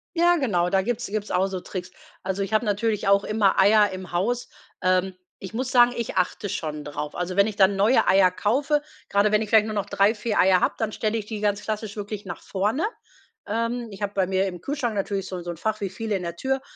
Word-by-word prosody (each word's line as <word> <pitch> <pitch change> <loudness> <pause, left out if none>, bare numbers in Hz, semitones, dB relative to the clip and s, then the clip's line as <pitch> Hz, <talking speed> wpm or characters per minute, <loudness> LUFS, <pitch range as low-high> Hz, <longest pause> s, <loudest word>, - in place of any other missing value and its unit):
Ja, 345 +1 +4
genau, 180 - +1
da 190 0 +2
gibt's 240 +3 -2
gibt's 210 +1 -4
auch 185 +1 +2
so 190 -1 -4
Tricks. 180 0 -7 0.3
Also 190 +1 -2
ich 195 +2 -3
habe 215 +2 +2
natürlich 210 0 0
auch 200 0 +4
immer 210 -3 +2
Eier 205 +1 +5
im 185 -1 -8
Haus. 230 +8 -1 0.3
Ähm, 185 +1 +2 0.3
ich 190 +2 -8
muss 255 +2 -2
sagen, 245 -1 +5
ich 235 -4 -4
achte 185 +2 0
schon 150 -4 -4
drauf. 150 0 -5
Also 180 +1 -3
wenn 200 +1 +5
ich 215 - -4
dann 195 0 +4
neue 210 +6 +3
Eier 190 -1 +5
kaufe, 280 +10 +1 0.3
gerade 200 +1 +3
wenn 210 - +3
ich 215 - -7
vielleicht 220 -1 +5
nur 215 - -4
noch 205 - -1
3, 200 +3 +2
4 210 0 -2
Eier 185 -1 +5
habe, - - +2
dann 220 -1 -1
stelle 215 +1 -1
ich 210 - -5
die 215 -1 -5
ganz 205 -1 0
klassisch 215 0 -4
wirklich 205 0 -6
nach 175 -2 -7
vorne. 210 +10 -1 0.6
Ähm, 230 +2 -2
ich 200 +1 -11
habe 205 0 -2
bei 190 - +2
mir 190 +1 +1
im 180 -3 -7
Kühlschrank 260 -5 -2
natürlich 195 -1 -2
so 185 - -5
'n 175 - -7
so 175 - -4
'n 170 - -8
Fach 215 +5 -2
wie 195 - -1
viele 220 +1 -3
in 180 - -7
der 170 0 -4
Tür 265 +8 -1
205 Hz, 245 wpm, -24 LUFS, 190-220 Hz, 0.6 s, Eier